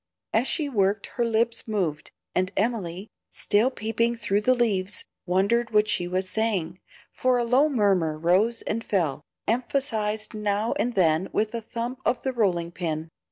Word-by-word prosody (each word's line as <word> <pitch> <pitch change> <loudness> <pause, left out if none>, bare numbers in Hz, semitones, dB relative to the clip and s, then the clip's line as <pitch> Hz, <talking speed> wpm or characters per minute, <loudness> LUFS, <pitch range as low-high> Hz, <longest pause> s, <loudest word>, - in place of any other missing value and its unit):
As 230 +4 +2
she 310 -4 0
worked 200 -5 +1
her 240 - 0
lips 230 +1 0
moved, 175 -9 -2 0.2
and 185 +1 +1
Emily, 200 -3 -2 0.2
still 215 +5 +2
peeping 230 0 0
through 210 -3 0
the 255 +4 +3
leaves, 205 -5 0 0.2
wondered 200 +6 +2
what 210 -1 +3
she 175 -4 0
was 185 +1 -1
saying, 190 -5 -1 0.3
for 255 -1 +1
a 240 - +1
low 255 +6 +4
murmur 195 - +2
rose 190 +8 +2
and 230 +2 -2
fell, 160 -11 0 0.3
emphasized 225 -3 0
now 210 +1 0
and 245 +1 0
then 170 -1 +3
with 215 +1 0
a 230 - -2
thump 235 +3 -5
of 250 - 0
the 265 - -1
rolling 175 -7 +1
pin. 160 -2 -3
215 Hz, 160 wpm, -25 LUFS, 185-235 Hz, 0.3 s, low